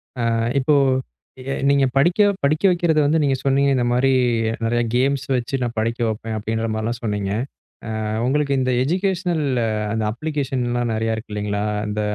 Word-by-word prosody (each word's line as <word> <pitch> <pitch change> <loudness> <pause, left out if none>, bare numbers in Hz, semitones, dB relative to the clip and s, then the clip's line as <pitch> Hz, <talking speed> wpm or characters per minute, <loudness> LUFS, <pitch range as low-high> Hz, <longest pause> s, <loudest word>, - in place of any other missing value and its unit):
அ 125 - -4 0.4
இப்போ 145 +3 +2 0.7
எ 135 +1 -4 0.2
நீங்க 140 -1 +4
படிக்க 170 +8 +3 0.2
படிக்க 155 +5 +1
வைக்கிறத 170 -3 +2
வந்து 160 +3 +2
நீங்க 135 -1 +2
சொன்னீங்க, 140 +1 +2
இந்தமாரி 125 +2 +2 0.5
நிறைய 120 +1 +1
கேம்ஸ் 135 +2 +1
வச்சு 125 +1 -1
நான் 120 -1 -2
படிக்க 115 +2 -1
வைப்பேன் 110 0 -3
அப்படின்ற 110 +1 -2
மாரிலாம் 110 +2 -2
சொன்னீங்க. 105 -3 -2 0.7
அ - - -3 0.2
உங்களுக்கு 140 +2 +1
இந்த 130 0 0
எஜிகேஷனல் 180 +1 0 0.5
அந்த 110 -1 -1
அப்ளிகேஷன் 140 -2 -2
எல்லாம் 120 -1 -1
நிறைய 110 0 0
இருக்கு 110 -1 -7
இல்லைங்களா? 105 0 -2 0.2
அந்த 105 0 -2
130 Hz, 155 wpm, -21 LUFS, 115-145 Hz, 0.7 s, நீங்க